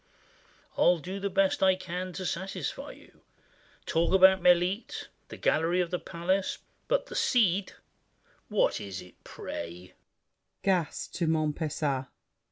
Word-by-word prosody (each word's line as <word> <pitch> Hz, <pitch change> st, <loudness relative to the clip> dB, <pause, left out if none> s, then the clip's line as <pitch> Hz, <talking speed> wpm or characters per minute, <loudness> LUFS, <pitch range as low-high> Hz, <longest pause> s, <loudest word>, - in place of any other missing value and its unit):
I'll 175 Hz, -, +5 dB
do 185 Hz, +5 st, -6 dB
the 200 Hz, 0 st, -2 dB
best 195 Hz, 0 st, +2 dB
I 190 Hz, -1 st, +5 dB
can 185 Hz, 0 st, -5 dB
To 185 Hz, +2 st, -5 dB
satisfy 190 Hz, +3 st, -4 dB
you: -, -, -19 dB, 0.6 s
talk 170 Hz, +3 st, +2 dB
about 190 Hz, 0 st, +7 dB
"Melite," 180 Hz, +5 st, +2 dB, 0.2 s
"The -, -, -9 dB
Gallery 165 Hz, +3 st, +2 dB
of 175 Hz, -2 st, 0 dB
the 180 Hz, -, -1 dB
Palace," 185 Hz, +3 st, -1 dB, 0.3 s
but -, -, +1 dB
"The -, -, -10 dB
Cid!" 200 Hz, -6 st, +2 dB, 0.8 s
What -, -, +2 dB
is 95 Hz, -2 st, -6 dB
it, 90 Hz, -, -19 dB
pray? 85 Hz, +2 st, -7 dB
185 Hz, 115 wpm, -29 LUFS, 170-190 Hz, 0.8 s, about